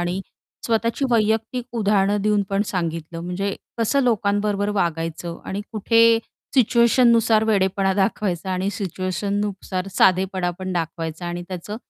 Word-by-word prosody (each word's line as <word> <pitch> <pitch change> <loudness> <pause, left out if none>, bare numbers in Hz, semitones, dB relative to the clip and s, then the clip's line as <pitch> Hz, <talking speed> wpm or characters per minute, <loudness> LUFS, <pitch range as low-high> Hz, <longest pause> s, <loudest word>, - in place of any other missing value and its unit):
आणि 175 +2 -2 0.5
स्वतःची 230 +3 0
वैयक्तिक 225 +2 +1
उदाहरणं 205 -1 +2
देऊन 210 -1 +2
पण 195 +1 +2
सांगितलं 165 -2 -3
म्हणजे 190 +3 -3 0.2
कसं 230 +5 +2
लोकांबरोबर 205 -3 +1
वागायचं 165 0 -3
आणि 195 - -4
कुठे 230 +1 +4 0.4
सिच्युएशननुसार 235 -2 +4
वेडेपणा 195 -2 +1
दाखवायचा 190 -2 -1
आणि 185 +2 -1
सिच्युएशननुसार 195 0 -3
साधेपणा 185 -1 +3
पण 185 0 -4
दाखवायचा 165 0 -4
आणि 175 0 -4
त्याचं 185 +4 -6
195 Hz, 115 wpm, -22 LUFS, 180-220 Hz, 0.5 s, कुठे